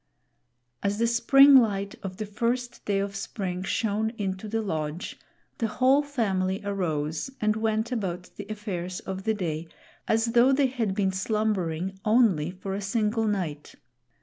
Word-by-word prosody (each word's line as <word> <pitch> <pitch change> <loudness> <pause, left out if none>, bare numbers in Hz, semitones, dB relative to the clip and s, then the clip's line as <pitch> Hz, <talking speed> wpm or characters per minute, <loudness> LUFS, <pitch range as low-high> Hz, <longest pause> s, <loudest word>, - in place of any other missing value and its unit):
As 200 +1 0
the 230 - +2
spring 270 +4 +7
light 200 -5 +2
of 185 -1 -6
the 215 - -3
first 240 +4 -2
day 200 -1 +1
of 200 0 -2
spring 190 -2 -4
shone 215 +2 0
into 190 0 -3
the 225 +1 -1
lodge, 160 -2 -4 0.4
the 225 - +1
whole 260 +5 +3
family 195 -9 -1
arose 160 - -2
and 215 0 +2
went 220 +1 0
about 185 -6 -3
the - - -8
affairs 185 -4 -4
of 190 0 -6
the 220 -1 +2
day 165 -4 -3 0.4
as 225 +1 +2
though 245 +2 +6
they 275 +1 +3
had 235 -7 -1
been 195 -2 +1
slumbering 190 -3 -1
only 215 -9 +3
for 190 +1 -6
a 200 - -3
single 220 +2 0
night. 170 -8 -3
205 Hz, 155 wpm, -27 LUFS, 185-225 Hz, 0.4 s, spring